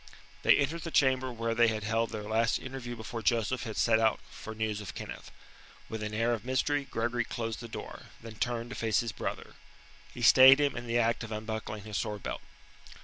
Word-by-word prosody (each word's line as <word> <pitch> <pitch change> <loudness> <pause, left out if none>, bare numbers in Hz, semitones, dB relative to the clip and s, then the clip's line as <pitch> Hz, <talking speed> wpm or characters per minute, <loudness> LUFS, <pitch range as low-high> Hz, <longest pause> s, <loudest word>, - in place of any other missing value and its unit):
They - - +6
entered 150 +4 0
the 165 - -5
chamber 130 -4 +2
where 115 -1 -2
they 120 +1 +4
had 110 -1 -1
held 115 +1 0
their 110 -1 -5
last 110 +2 +1
interview 130 -2 -6
before 115 +1 -6
Joseph 120 +2 0
had 110 -2 -6
set 110 -1 +4
out 110 -1 +2
for 110 - -8
news 110 -1 -2
of 95 -3 -8
Kenneth. - - -7 0.6
With 110 -1 -5
an 105 0 -3
air 115 +2 +2
of 110 -3 -3
mystery 140 +3 0
Gregory 120 +2 -1
closed 115 -2 -4
the 120 - -7
door, 115 - -8
then 115 -1 -9
turned 120 0 -2
to - - -5
face 110 -2 +1
his 115 -2 -3
brother. - - -5 0.6
He 120 - -7
stayed 130 +3 +9
him 145 -2 +1
in 120 0 -6
the 115 +1 +1
act 115 0 +1
of 110 - -7
unbuckling 110 -1 -4
his 105 -1 -3
sword 105 -1 -4
belt. - - -4
115 Hz, 210 wpm, -30 LUFS, 110-120 Hz, 0.6 s, stayed